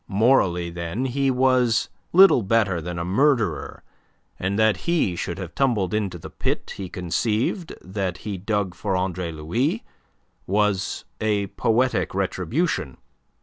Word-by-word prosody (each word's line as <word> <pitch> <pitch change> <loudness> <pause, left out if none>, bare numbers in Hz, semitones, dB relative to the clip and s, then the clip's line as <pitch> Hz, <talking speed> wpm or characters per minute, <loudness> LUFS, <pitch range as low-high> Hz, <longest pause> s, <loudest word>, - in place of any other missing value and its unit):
Morally, 95 -5 +2
then, 85 +8 -3
he 135 +1 +1
was 125 -3 +3 0.2
little 190 -7 +7
better 100 -4 +1
than 90 +1 -5
a 85 - -2
murderer, 105 - +1 0.6
and 95 +2 -1
that 110 -3 +3
he 155 - +2
should 85 0 -4
have 90 -3 -7
tumbled 110 -9 +1
into 100 -4 -1
the 80 - -10
pit - - -3
he 95 -2 -5
conceived 110 - -1
that 95 -1 -3
he 105 -2 -2
dug 100 -1 -1
for 95 +2 -2
Andre 90 -2 -2
Louis 120 - -1 0.6
was 100 -1 0 0.2
a 105 -2 +1
poetic 115 -1 0
retribution. 95 - -1
100 Hz, 135 wpm, -24 LUFS, 90-120 Hz, 0.6 s, little